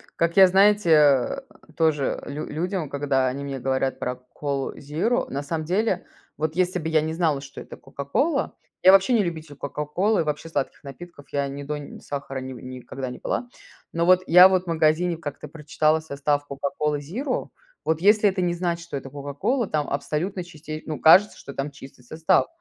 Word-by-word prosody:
Как 170 Hz, +2 st, 0 dB
я, 190 Hz, -1 st, +9 dB
знаете, 200 Hz, 0 st, +4 dB
э, 145 Hz, -, +4 dB, 0.4 s
тоже 155 Hz, -4 st, +1 dB
лю 145 Hz, +2 st, -5 dB
людям, 170 Hz, 0 st, -3 dB
когда 140 Hz, -2 st, 0 dB
они 135 Hz, +2 st, -3 dB
мне 135 Hz, -1 st, -5 dB
говорят 130 Hz, +1 st, -1 dB
про 125 Hz, -, -2 dB, 0.2 s
"Колу" 140 Hz, -2 st, -3 dB
зиро, 160 Hz, -, -1 dB
на 140 Hz, +1 st, -3 dB
самом 155 Hz, +1 st, -3 dB
деле, 190 Hz, +2 st, 0 dB, 0.3 s
вот 155 Hz, +1 st, -2 dB
если 180 Hz, 0 st, +1 dB
бы 160 Hz, 0 st, -3 dB
я 160 Hz, -1 st, +3 dB
не 160 Hz, +1 st, -3 dB
знала, 160 Hz, -4 st, 0 dB
что 140 Hz, 0 st, -10 dB
это -, -, -11 dB
"Кока-Кола" 140 Hz, -, -2 dB, 0.3 s
я 185 Hz, -, +9 dB
вообще 195 Hz, +5 st, +5 dB
не 220 Hz, -4 st, +4 dB
любитель 160 Hz, -4 st, -5 dB
"Кока-Колы", 150 Hz, +8 st, -1 dB
вообще 150 Hz, +2 st, -4 dB
сладких 140 Hz, -3 st, -3 dB
напитков, 145 Hz, +1 st, -11 dB
я 140 Hz, -1 st, 0 dB
ни 140 Hz, +1 st, -6 dB
до 150 Hz, +1 st, -4 dB
ни 145 Hz, -, -9 dB
сахара, 140 Hz, -1 st, -5 dB
ни 130 Hz, 0 st, -7 dB
никогда 130 Hz, +1 st, -7 dB
не 125 Hz, -, -8 dB
пила. 245 Hz, -, -2 dB, 0.5 s
Ну, 170 Hz, 0 st, +1 dB
вот, 185 Hz, +1 st, +5 dB
я 180 Hz, +2 st, +9 dB
вот, 185 Hz, -1 st, +1 dB
в -, -, -22 dB
магазине 165 Hz, +1 st, +2 dB
как-то 150 Hz, -2 st, -7 dB
прочитала 155 Hz, +1 st, 0 dB
состав 145 Hz, -1 st, -1 dB
"Кока-Колы" 145 Hz, +2 st, -2 dB
зиро, 240 Hz, -, -3 dB, 0.4 s
вот 160 Hz, 0 st, 0 dB
если 210 Hz, +2 st, +5 dB
это 190 Hz, -1 st, -2 dB
не 175 Hz, -1 st, +1 dB
знать, 170 Hz, -1 st, -1 dB
что 170 Hz, -4 st, -6 dB
это 135 Hz, 0 st, -8 dB
"Кока-Кола", 145 Hz, -, -2 dB
там 150 Hz, -3 st, -1 dB
абсолютно 165 Hz, +6 st, -2 dB
чисте 155 Hz, -2 st, -8 dB
ну, 155 Hz, -, -4 dB
кажется 190 Hz, +6 st, +6 dB
что 140 Hz, -, -10 dB
там 140 Hz, +2 st, -3 dB
чистый 135 Hz, -2 st, -13 dB
состав, 160 Hz, +8 st, +1 dB
155 Hz, 190 wpm, -24 LUFS, 140-180 Hz, 0.5 s, я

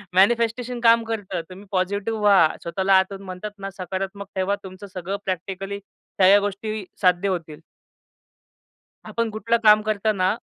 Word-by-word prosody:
Manifestation 235 Hz, +4 st, +2 dB
काम 230 Hz, 0 st, +5 dB
करतं. 220 Hz, -6 st, -4 dB
तुम्ही 190 Hz, +3 st, -11 dB
पॉझिटिव्ह 200 Hz, +4 st, -1 dB
व्हा. 195 Hz, -6 st, +5 dB
स्वतःला 190 Hz, +3 st, +1 dB
आतून 195 Hz, +1 st, 0 dB
म्हणतात 185 Hz, +3 st, -6 dB
ना, 195 Hz, 0 st, -5 dB
सकारात्मक 195 Hz, +2 st, -5 dB
ठेवा, 190 Hz, +2 st, +1 dB
तुमचं 190 Hz, +1 st, -10 dB
सगळं 185 Hz, +2 st, -4 dB
प्रॅक्टिकली 195 Hz, +2 st, -4 dB
सगळ्या 195 Hz, 0 st, +2 dB
गोष्टी 205 Hz, 0 st, -4 dB, 0.2 s
साध्य 180 Hz, 0 st, +3 dB
होतील. 165 Hz, -5 st, -4 dB, 1.5 s
आपण 230 Hz, -1 st, -1 dB
कुठलं 230 Hz, +2 st, 0 dB
काम 215 Hz, 0 st, +7 dB
करताना 210 Hz, -2 st, +1 dB
200 Hz, 130 wpm, -23 LUFS, 185-215 Hz, 1.5 s, काम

